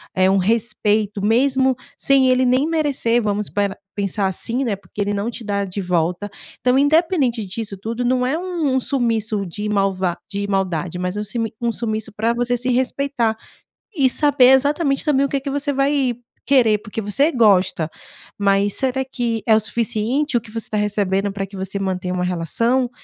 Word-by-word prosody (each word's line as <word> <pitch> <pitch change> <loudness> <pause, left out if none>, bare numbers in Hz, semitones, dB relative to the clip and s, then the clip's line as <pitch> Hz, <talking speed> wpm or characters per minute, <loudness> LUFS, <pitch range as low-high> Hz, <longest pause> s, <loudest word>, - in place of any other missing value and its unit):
eh, 185 0 +4
um 195 - +3
respeito 210 0 0
mesmo 260 +4 +2 0.2
sem 270 -1 +3
ele 255 0 +3
nem 255 +3 +3
merecer. 285 -7 +1
Vamos 210 -1 -1
para 200 -1 -1 0.2
pensar 200 0 -1
assim, 230 +7 -1
né, 225 -6 -1
porque 200 +1 -8
ele 205 0 0
não 205 +3 -2
te 235 0 -8
dá 200 -1 -1
de 195 +1 -5
volta. 180 +2 -1 0.3
Então 255 +1 +3
independente 285 - +2
disso 205 +2 -5
tudo, 230 +5 -4
não 250 0 +1
é 270 +5 0
um 360 -1 -4
um 265 -3 +2
sumiço 225 -6 0
de 205 +4 -5
malva 195 -3 0
de 200 0 -3
maldade, 180 -4 -1
mas 180 +2 -3
é - - -1
um - - -2
simi 225 +1 -3
um 235 -1 0
sumiço 220 -1 -3
pra 225 +2 +1
você 245 +1 0
se 245 +1 -3
respeitar, 255 -2 0 0.6
e 275 -5 +4
saber 270 -2 +5
exatamente 280 +1 +2
também 280 -3 +2
o - - -3
que 275 0 -1
que 280 - -4
você 285 +1 -1
vai 275 -2 +1 0.4
querer, 240 -6 +5
porque 210 +1 -6
você 235 +9 +2
gosta, 190 - +2 0.5
mas 200 0 +2
será 265 0 0
que 240 -4 -3
é 225 - +4
o 215 - +5
suficiente 235 +5 0
o - - -2
que 225 - -14
você 225 +1 -5
tá 215 - -2
recebendo 205 -1 0
pra 195 0 -3
que 195 0 -11
você 190 +1 -4
mantenha 185 -2 -2
uma 180 0 -1
relação? 230 - 0
225 Hz, 190 wpm, -20 LUFS, 200-260 Hz, 0.6 s, saber